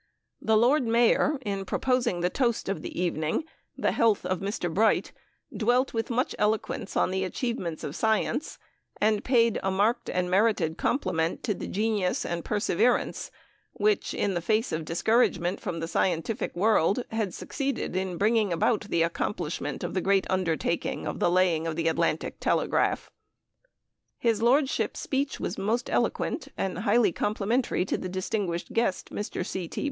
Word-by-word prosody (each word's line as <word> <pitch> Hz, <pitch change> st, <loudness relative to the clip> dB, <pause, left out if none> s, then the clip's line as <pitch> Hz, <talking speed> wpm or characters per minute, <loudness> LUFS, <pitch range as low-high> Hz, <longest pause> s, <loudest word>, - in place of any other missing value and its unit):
The 220 Hz, -1 st, +3 dB
Lord 250 Hz, +3 st, +3 dB
Mayor, 240 Hz, +6 st, +3 dB
in 195 Hz, -1 st, -2 dB
proposing 240 Hz, -3 st, 0 dB
the 180 Hz, +1 st, +1 dB
toast 240 Hz, -4 st, 0 dB
of 195 Hz, -, -2 dB
the -, -, -6 dB
evening, 165 Hz, -, 0 dB, 0.3 s
"The -, -, +1 dB
health 225 Hz, -3 st, +2 dB
of 185 Hz, 0 st, -1 dB
Mr. 195 Hz, -4 st, -3 dB
Bright," 220 Hz, +5 st, +2 dB, 0.4 s
dwelt 245 Hz, +4 st, +2 dB
with 225 Hz, -1 st, -2 dB
much 250 Hz, +2 st, 0 dB
eloquence 210 Hz, -2 st, -1 dB
on -, -, +2 dB
the 190 Hz, 0 st, 0 dB
achievements 185 Hz, -, -3 dB
of 145 Hz, -, -5 dB
science, 225 Hz, +6 st, 0 dB, 0.4 s
and 215 Hz, 0 st, +2 dB
paid 235 Hz, -4 st, +3 dB
a 190 Hz, -, 0 dB
marked 215 Hz, +5 st, +1 dB
and 180 Hz, 0 st, 0 dB
merited 185 Hz, -4 st, +2 dB
compliment 175 Hz, -, -1 dB
to 210 Hz, -, 0 dB
the -, -, -6 dB
genius 210 Hz, -3 st, 0 dB
and 170 Hz, -1 st, -3 dB
perseverance 215 Hz, +3 st, +1 dB, 0.4 s
which, 425 Hz, -1 st, +1 dB
in 200 Hz, -, 0 dB
the 175 Hz, -, -1 dB
face 220 Hz, +6 st, +1 dB
of 160 Hz, 0 st, -2 dB
discouragement 180 Hz, 0 st, +1 dB
from 170 Hz, -4 st, -4 dB
the 165 Hz, -, -2 dB
scientific 170 Hz, +4 st, -1 dB
world, 205 Hz, +3 st, +3 dB
had 220 Hz, -4 st, -1 dB
succeeded 275 Hz, -, -3 dB
in 185 Hz, -2 st, -2 dB
bringing 215 Hz, 0 st, +2 dB
about 195 Hz, +6 st, +2 dB
the 165 Hz, -, +2 dB
accomplishment 160 Hz, -3 st, -3 dB
of -, -, -3 dB
the 185 Hz, -, 0 dB
great 195 Hz, 0 st, +2 dB
undertaking 170 Hz, -2 st, -1 dB
of -, -, -4 dB
the -, -, +3 dB
laying 175 Hz, -3 st, +2 dB
of 160 Hz, -, -2 dB
the 165 Hz, 0 st, 0 dB
Atlantic 160 Hz, -, 0 dB
telegraph. -, -, +1 dB, 1.1 s
His 225 Hz, -2 st, +1 dB
lordship's 265 Hz, +4 st, +2 dB
speech 275 Hz, +1 st, -2 dB
was -, -, -3 dB
most 225 Hz, +5 st, -1 dB
eloquent, -, -, 0 dB
and 185 Hz, -2 st, -2 dB
highly 215 Hz, 0 st, +3 dB
complimentary 210 Hz, +2 st, 0 dB
to -, -, -1 dB
the 185 Hz, -, -5 dB
distinguished 185 Hz, -2 st, -3 dB
guest, 230 Hz, -5 st, 0 dB
Mr. 205 Hz, -3 st, -4 dB
C. 185 Hz, -3 st, -4 dB
T. -, -, -6 dB
200 Hz, 160 wpm, -27 LUFS, 180-230 Hz, 1.1 s, The